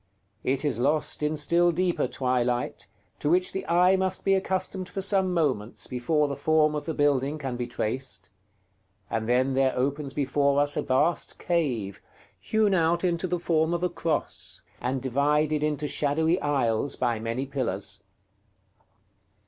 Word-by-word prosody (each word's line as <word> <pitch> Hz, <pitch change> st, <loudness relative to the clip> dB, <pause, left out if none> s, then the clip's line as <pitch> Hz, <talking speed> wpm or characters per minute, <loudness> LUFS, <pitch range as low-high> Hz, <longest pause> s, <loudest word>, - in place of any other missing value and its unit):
It 135 Hz, +3 st, 0 dB
is 130 Hz, -6 st, 0 dB
lost 150 Hz, +5 st, 0 dB
in 150 Hz, +1 st, 0 dB
still 170 Hz, +3 st, +3 dB
deeper 175 Hz, +1 st, 0 dB
twilight, 125 Hz, -2 st, -1 dB, 0.3 s
to 145 Hz, -, 0 dB
which 180 Hz, +2 st, +2 dB
the 190 Hz, -, -5 dB
eye 180 Hz, +3 st, +4 dB
must 190 Hz, 0 st, -1 dB
be 195 Hz, -, +4 dB
accustomed 190 Hz, -1 st, -1 dB
for 195 Hz, -, -5 dB
some 195 Hz, -1 st, +3 dB
moments 135 Hz, -11 st, -1 dB
before 145 Hz, +5 st, 0 dB
the 140 Hz, -, -3 dB
form 155 Hz, +2 st, +2 dB
of 150 Hz, -, -3 dB
the 160 Hz, -, -2 dB
building 145 Hz, 0 st, +1 dB
can 135 Hz, -4 st, -4 dB
be 120 Hz, 0 st, -3 dB
traced; 120 Hz, -4 st, -4 dB, 0.8 s
and 110 Hz, 0 st, -2 dB
then 130 Hz, +2 st, +2 dB
there 135 Hz, -1 st, +2 dB
opens 140 Hz, +2 st, -1 dB
before 140 Hz, 0 st, +2 dB
us 145 Hz, 0 st, +1 dB
a -, -, 0 dB
vast 145 Hz, +7 st, 0 dB
cave, 125 Hz, -, -1 dB, 0.4 s
hewn 210 Hz, -, +1 dB
out 170 Hz, 0 st, +2 dB
into 175 Hz, 0 st, 0 dB
the 180 Hz, 0 st, -1 dB
form 165 Hz, -1 st, +1 dB
of 170 Hz, -, -3 dB
a 180 Hz, -, +2 dB
Cross, 165 Hz, -2 st, -3 dB, 0.2 s
and 130 Hz, 0 st, -2 dB
divided 150 Hz, +3 st, +1 dB
into 150 Hz, -1 st, -1 dB
shadowy 160 Hz, +5 st, +1 dB
aisles 135 Hz, -3 st, 0 dB
by 120 Hz, -3 st, 0 dB
many 115 Hz, +4 st, -3 dB
pillars. 125 Hz, -8 st, -3 dB
145 Hz, 155 wpm, -26 LUFS, 130-170 Hz, 0.8 s, eye